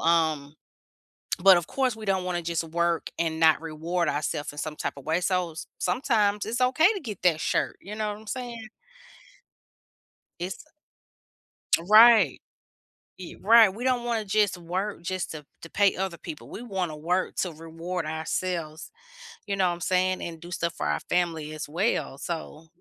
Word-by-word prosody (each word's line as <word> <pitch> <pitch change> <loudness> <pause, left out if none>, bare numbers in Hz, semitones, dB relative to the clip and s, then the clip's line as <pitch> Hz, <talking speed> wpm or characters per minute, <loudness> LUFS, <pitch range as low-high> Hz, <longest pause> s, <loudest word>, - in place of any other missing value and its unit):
um, 160 -3 +1 0.9
but, 190 +1 +8
of 175 - -2
course, 260 -4 0
we 220 - -10
don't 190 -2 +1
wanna 175 -1 -1
just 170 0 -1
work 170 +1 0
and 160 -1 -1
not 160 -1 +5
reward 165 +2 -2
ourself 145 0 -2
in - - -14
some 155 -1 -4
type - - -2
of 140 - -11
way, 160 +3 +1
so 180 -2 0
s 165 - -8
sometimes 205 +1 +1
it's 235 +3 -2
okay 310 - +5
to 400 - -4
get 215 -7 -7
that 165 -3 +4
shirt, - - 0
you 205 +3 -8
know 215 -1 -1
what 205 - -10
I'm 220 - -16
saying? 235 -3 -5 1.7
It's 180 +9 -5 1.2
Right. 215 - +7 0.8
Ye 180 -2 -9
right. 220 -2 +7
We 235 - -7
don't 250 -2 +2
wanna 230 -3 -1
just 200 -2 +2
work 180 +3 -3
just 185 +1 -3
to 150 -2 -8 0.2
to 165 - -10
pay 200 +2 +3
other 190 -2 -3
people. 155 -2 -9
We - - -7
wanna 190 -9 -3
work 180 +4 -1
to 180 - 0
reward 165 +3 -5
ourselves. 160 0 -3 0.5
You 200 - -1
know 190 -2 +2
what 175 - 0
I'm 175 - -13
saying? 185 0 +1
And 165 -1 -6
do 170 - -11
stuff 170 -1 -2
for - - -4
our 75 0 0
family 165 - -1
as 155 -1 -6
well, 170 - -1
so 160 0 -6
180 Hz, 175 wpm, -26 LUFS, 160-210 Hz, 1.7 s, but